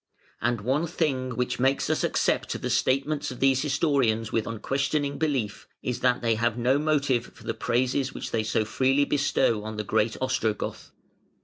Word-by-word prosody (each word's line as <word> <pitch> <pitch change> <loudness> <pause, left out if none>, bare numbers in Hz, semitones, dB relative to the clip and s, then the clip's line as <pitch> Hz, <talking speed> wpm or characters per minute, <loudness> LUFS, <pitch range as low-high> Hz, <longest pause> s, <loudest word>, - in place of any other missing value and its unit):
And 120 -1 0
one 135 +9 0
thing 130 -7 -1
which 125 +1 -1
makes 135 +2 +2
us - - 0
accept - - 0
the - - -3
statements 140 +3 +1
of 125 - -8
these 135 -1 +3
historians 135 -7 +1
with 115 - 0
unquestioning 140 +5 -1
belief 135 -10 -1 0.2
is 125 -1 -2
that 125 -1 +1
they 115 -1 +3
have 115 +1 0
no 125 +4 +2
motive 145 -5 +1
for - - -15
the - - -2
praises 130 +2 0
which - - -6
they 115 - +1
so 110 0 0
freely 135 +5 +2
bestow 140 -7 +1
on 110 0 -6
the 105 - -2
great 110 +2 0
Ostrogoth. 115 -5 -2
130 Hz, 175 wpm, -26 LUFS, 115-140 Hz, 0.2 s, these